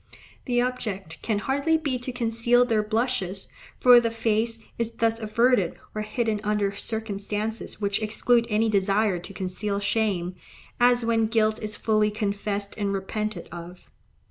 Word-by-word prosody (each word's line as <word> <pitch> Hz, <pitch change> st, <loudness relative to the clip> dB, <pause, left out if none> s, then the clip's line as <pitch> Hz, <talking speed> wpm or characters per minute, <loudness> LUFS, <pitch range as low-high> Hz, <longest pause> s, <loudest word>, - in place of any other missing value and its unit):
The 245 Hz, -2 st, +1 dB
object 205 Hz, -9 st, -3 dB
can 220 Hz, -3 st, 0 dB
hardly 280 Hz, +8 st, +1 dB
be 280 Hz, -5 st, -2 dB
to 250 Hz, +1 st, -4 dB
conceal 240 Hz, 0 st, +2 dB
their 225 Hz, -3 st, +2 dB
blushes, 210 Hz, -4 st, -2 dB, 0.3 s
for 245 Hz, -1 st, +8 dB
the 230 Hz, -1 st, 0 dB
face 225 Hz, 0 st, 0 dB, 0.2 s
is 230 Hz, 0 st, -1 dB
thus 230 Hz, 0 st, +1 dB
averted 220 Hz, -3 st, +2 dB, 0.2 s
or 215 Hz, -, -3 dB
hidden 215 Hz, -1 st, -1 dB
under 205 Hz, -1 st, 0 dB
circumstances 215 Hz, +1 st, -4 dB
which 200 Hz, 0 st, 0 dB
exclude 235 Hz, +2 st, +2 dB
any 215 Hz, +1 st, +2 dB
desire 200 Hz, -1 st, +2 dB
to 180 Hz, +3 st, -10 dB
conceal 195 Hz, +2 st, -3 dB
shame, 200 Hz, -4 st, 0 dB, 0.5 s
as 245 Hz, -1 st, +4 dB
when 225 Hz, -1 st, +2 dB
guilt 220 Hz, -1 st, +1 dB
is 210 Hz, -1 st, -3 dB
fully 215 Hz, -1 st, +2 dB
confessed 205 Hz, -1 st, -2 dB
and 200 Hz, -1 st, 0 dB
repented 200 Hz, 0 st, -3 dB
of. 175 Hz, +1 st, -10 dB
215 Hz, 145 wpm, -25 LUFS, 200-230 Hz, 0.5 s, for